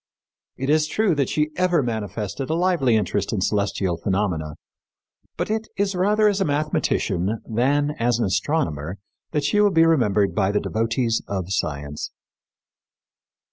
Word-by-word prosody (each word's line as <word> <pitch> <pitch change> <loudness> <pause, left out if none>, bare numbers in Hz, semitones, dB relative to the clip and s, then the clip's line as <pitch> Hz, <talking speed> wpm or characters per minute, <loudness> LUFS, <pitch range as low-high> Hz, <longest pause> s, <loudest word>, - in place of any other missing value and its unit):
It 135 +2 -1
is 155 0 +3
true 205 +4 +1
that 140 -4 0
she 150 0 0
ever 180 -4 +2
manifested 110 - -4
a 160 - +1
lively 170 -9 +2
interest 100 -1 0
in 110 - -1
celestial 100 -3 0
phenomena; 90 -5 -1 0.8
but - - -2
it 220 0 -1
is 200 0 +1
rather 210 +4 +3
as 200 -1 +1
a - - +3
mathematician 115 - 0
than 140 +6 +1
as 120 0 +2
an 120 - 0
astronomer 95 - -1 0.3
that 150 - -1
she 150 +9 +2
will 205 - +5
be 165 -3 +4
remembered 105 -11 +2
by 100 -2 +1
the 105 - +1
devotees 115 +1 0
of 95 -2 -3
science. 75 -2 -3
120 Hz, 150 wpm, -23 LUFS, 100-160 Hz, 0.8 s, will